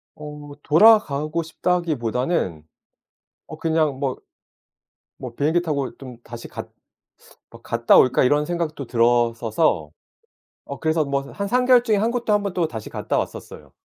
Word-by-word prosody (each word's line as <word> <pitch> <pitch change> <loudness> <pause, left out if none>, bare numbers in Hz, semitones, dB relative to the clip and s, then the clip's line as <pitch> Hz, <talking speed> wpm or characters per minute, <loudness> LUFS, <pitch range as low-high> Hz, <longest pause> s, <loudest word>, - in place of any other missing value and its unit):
어 150 -1 -10
돌아가고 165 -4 +4
싶다기보다는 150 - -1 0.8
어 - - -9
그냥 155 -4 0
뭐 135 -3 -2 1.1
뭐 120 -2 -7
'비행기 160 +6 +1
타고 140 -8 -3
좀 130 -3 -10
다시 120 0 -9
갔 - - -8 0.8
뭐 - - -14
갔다 115 0 +2
올까?' 130 0 +4
이런 145 +3 +2
생각도 160 -6 -3
들었어서 115 - +1 0.8
어 140 - -8
그래서 160 -1 +1
뭐 140 0 -1
한 200 -1 -4
3 250 +4 +1
개월 250 -1 +5
중에 220 -3 +1
한국도 230 +1 0
1 205 -1 +2
번 200 - -3
또 170 -3 0
다시 110 -5 -8
갔다 - - -3
왔었어요. - - -6
150 Hz, 270 characters per minute, -22 LUFS, 125-175 Hz, 1.1 s, 개월